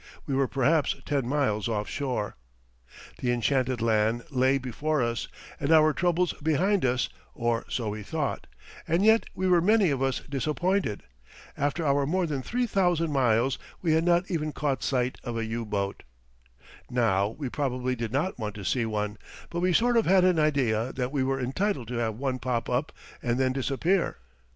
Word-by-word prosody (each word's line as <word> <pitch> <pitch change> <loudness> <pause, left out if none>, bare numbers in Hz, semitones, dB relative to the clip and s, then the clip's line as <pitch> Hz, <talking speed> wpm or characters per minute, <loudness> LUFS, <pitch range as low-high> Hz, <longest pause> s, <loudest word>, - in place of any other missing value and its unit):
We 140 - -3
were 135 0 +2
perhaps 140 +4 +2
ten 140 -4 0
miles 125 -7 0
offshore. 115 +1 -2 0.8
The 125 - 0
enchanted 125 0 0
land 110 +1 +2
lay 130 +1 +3
before 135 +3 -1
us 115 -1 -2 0.3
and 140 +2 0
our 155 -1 +6
troubles 175 +2 +1
behind 175 +6 +2
us 125 -1 +1 0.3
or 120 -1 0
so 115 -4 -2
we 105 +1 -5
thought - - -3 0.4
and 170 +5 +2
yet 220 +1 +5
we 185 - 0
were 175 -2 +5
many 200 -2 +4
of 135 -2 -1
us 135 -1 0
disappointed. 150 - -1 0.5
After 145 +4 -1
our 140 -1 +2
more 180 +3 +1
than 145 -5 -2
three 245 - -1
thousand 175 -6 +1
miles 125 -1 +2 0.2
we 165 -3 +3
had 160 +1 +3
not 175 +2 +2
even 155 -3 -1
caught 140 -6 -1
sight 125 0 -1
of 120 -2 -4
a 115 - -1
U 115 +1 -3
boat. 100 -1 -2 0.9
Now, 100 -5 +2
we 135 +6 -5
probably 130 -2 -1
did 115 -2 -4
not 145 +4 -1
want 105 -2 -4
to 100 -2 -7
see 120 +1 +1
one, 105 -1 -3 0.3
but 170 - -2
we 180 +1 +2
sort 240 +6 +3
of 225 - +2
had 190 0 +5
an 180 -3 +3
idea 130 -6 +1
that 125 0 -2
we 140 -3 0
were 135 +1 0
entitled 135 - -1
to 125 - -3
have 110 -2 -1
one 130 +1 -2
pop 120 -2 -2
up 125 +5 0 0.3
and 120 +1 0
then 130 -1 +2
disappear. 145 +8 0
135 Hz, 180 wpm, -27 LUFS, 120-160 Hz, 0.9 s, our